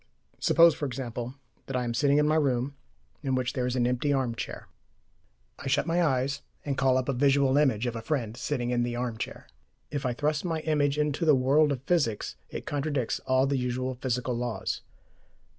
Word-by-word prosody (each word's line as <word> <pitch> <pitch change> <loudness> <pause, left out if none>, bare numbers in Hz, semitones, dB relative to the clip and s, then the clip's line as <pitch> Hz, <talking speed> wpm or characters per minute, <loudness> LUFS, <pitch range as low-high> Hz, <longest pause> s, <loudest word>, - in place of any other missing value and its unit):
Suppose, 170 -1 +6
for 145 0 -3
example, 125 -1 -5 0.3
that 135 - -4
I 125 - +1
am 120 -1 -2
sitting 140 +3 +3
in 150 0 +4
my 155 - +3
room, 140 -3 +1 0.5
in 135 -3 0
which 130 -1 -1
there 125 -2 -1
is 125 - -1
an 120 -2 +2
empty 125 +4 +1
arm 130 -4 +1
chair. 115 - -6 0.9
I - - -6
shut 135 +2 +2
my 170 +1 +2
eyes, 140 -1 0 0.2
and 140 -2 -1
call 130 -1 +3
up 130 - -1
a 140 - +1
visual 135 +1 +3
image 130 -6 +3
of 120 -1 -2
a 115 - -4
friend 115 -3 -2
sitting 125 -1 -2
in 120 -1 +1
the 120 0 -1
arm 120 -2 -3
chair. - - -5 0.5
If 145 -2 -2
I 125 -2 0
thrust 150 +3 0
my 165 -3 -1
image 150 -2 +1
into 150 +2 0
the 155 -3 +6
world 140 +4 +4
of 135 -2 -3
physics, 140 -11 0
it - - -6
contradicts 145 -4 -1
all 130 +1 +4
the 140 -1 0
usual 125 +1 -2
physical 125 0 -2
laws. 120 -1 -3
130 Hz, 205 wpm, -28 LUFS, 125-145 Hz, 0.9 s, Suppose